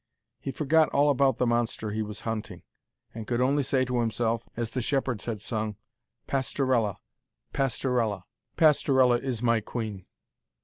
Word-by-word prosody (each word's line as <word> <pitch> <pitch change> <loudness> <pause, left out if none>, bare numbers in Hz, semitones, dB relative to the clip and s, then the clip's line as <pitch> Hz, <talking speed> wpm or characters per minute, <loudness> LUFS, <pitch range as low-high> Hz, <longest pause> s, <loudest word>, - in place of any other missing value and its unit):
He - - -5
forgot 155 +3 +3
all 145 +1 +3
about 135 -2 +2
the 125 - +1
monster 120 -2 0
he 110 +1 -2
was 105 0 -6
hunting, 110 -5 -5 0.5
and 110 -1 -7
could 120 -1 0
only 135 +3 +3
say 130 -1 +1
to 125 -1 -1
himself, 115 0 -1
as 115 -1 -2
the 130 - -2
shepherds 130 -3 -1
had 115 -3 -3
sung, 110 0 -3 0.5
'Pastorella... 130 -5 0 0.6
Pastorella... 120 -7 0 0.3
Pastorella 130 -5 +4
is 125 -3 -4
my 115 -1 +3
queen.' 105 -4 -5
120 Hz, 145 wpm, -27 LUFS, 110-135 Hz, 0.6 s, Pastorella